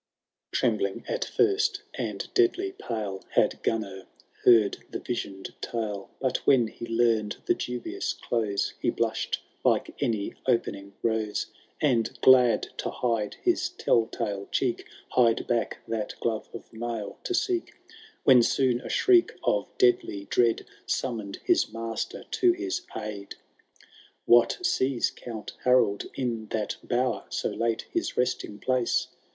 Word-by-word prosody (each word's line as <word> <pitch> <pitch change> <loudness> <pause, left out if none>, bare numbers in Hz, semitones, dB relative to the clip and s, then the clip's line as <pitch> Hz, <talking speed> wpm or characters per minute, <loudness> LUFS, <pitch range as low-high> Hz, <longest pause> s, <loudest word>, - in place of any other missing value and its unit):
XII. - - 0
Trembling - - 0
at - - -1
first, 410 +1 +1
and - - -4
deadly 375 0 +2
pale. 110 - -5
Had - - +2
Gunnar 100 -4 -2 0.4
heard 110 -4 +5
the - - -4
vision^d 100 -5 -5
tale; 105 -4 -3
But 130 -2 +1
when 130 -4 +4
he 115 - -8
learned 115 -2 +1
the - - +4
dubious 125 -1 -3
close, 105 -4 -1
He - - +1
blushed - - -1 0.2
like - - +2
any 110 -4 0
opening 100 -5 0
rose. 110 -2 -1 0.3
And, 125 -7 +1
glad 125 -2 +6
to - - -2
hide 115 -4 -1
his 360 0 +2
tell 120 - +2
tale 100 -1 -4
cheek. 125 -3 0 0.2
Hied 115 -2 +3
back 120 -1 0
that 110 -2 -3
glove 110 -2 -2
of 115 - -10
mail 115 -2 -5
to 365 - 0
seek; 365 -3 -1 0.5
When 130 -3 +7
soon 125 0 +2
a - - -7
shriek 365 -3 +4
of - - +1
deadly 365 - +2
dread 115 -2 +3 0.2
Summoned 110 -6 -2
his - - +3
master 115 0 -4
to 360 -2 +2
his 360 0 -3
idd. 100 -2 -5
XIII. - - -23 0.9
What 120 0 +5
sees 125 +1 +1
Count 110 -3 -8
Harold 125 -5 +3
in 115 -4 -2
that 105 -1 -2
bower. 125 0 0
So - - -2
late 115 -1 -1
his 345 0 -2
resting 125 -4 -1
place 130 +1 +1
115 Hz, 140 wpm, -27 LUFS, 110-130 Hz, 0.9 s, When